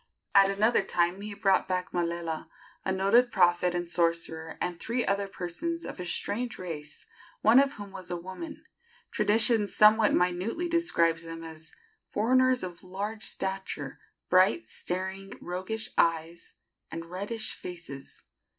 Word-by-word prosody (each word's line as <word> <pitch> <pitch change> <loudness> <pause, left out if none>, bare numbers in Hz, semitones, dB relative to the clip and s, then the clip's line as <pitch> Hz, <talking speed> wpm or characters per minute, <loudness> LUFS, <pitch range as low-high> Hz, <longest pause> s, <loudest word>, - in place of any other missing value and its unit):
At 195 -1 +7
another 215 +4 +3
time 175 +2 0
he 205 0 -6
brought 195 -2 +2
back 185 -1 -2
Malela, 170 -2 -2 0.3
a 190 - -1
noted 200 +6 +3
prophet 175 -1 +3
and 175 0 -2
sorcerer, 165 -1 -1
and 175 -1 -3
three 235 +5 -1
other 200 0 0
persons 315 - -4
of - - -7
a 180 - -4
strange 240 +7 -2
race, 150 -4 -7 0.4
one 225 +4 +7
of 280 0 +3
whom 205 -4 -9
was 185 -2 -8
a 175 - -2
woman. 190 - -8 0.5
Tradition 220 0 +4
somewhat 215 +1 +5
minutely 180 - 0
describes 170 - +2
them 165 0 -8
as 160 0 -8 0.4
"foreigners 255 +3 +3
of 175 -2 -7
large 200 +4 -5
stature, 190 -8 -3 0.3
bright, 115 -12 +4
staring, 190 - -4
roguish 185 +5 -2
eyes, 165 0 0 0.3
and 165 0 -6
reddish 200 +6 -1
faces." 170 -6 -8
185 Hz, 140 wpm, -28 LUFS, 170-215 Hz, 0.5 s, At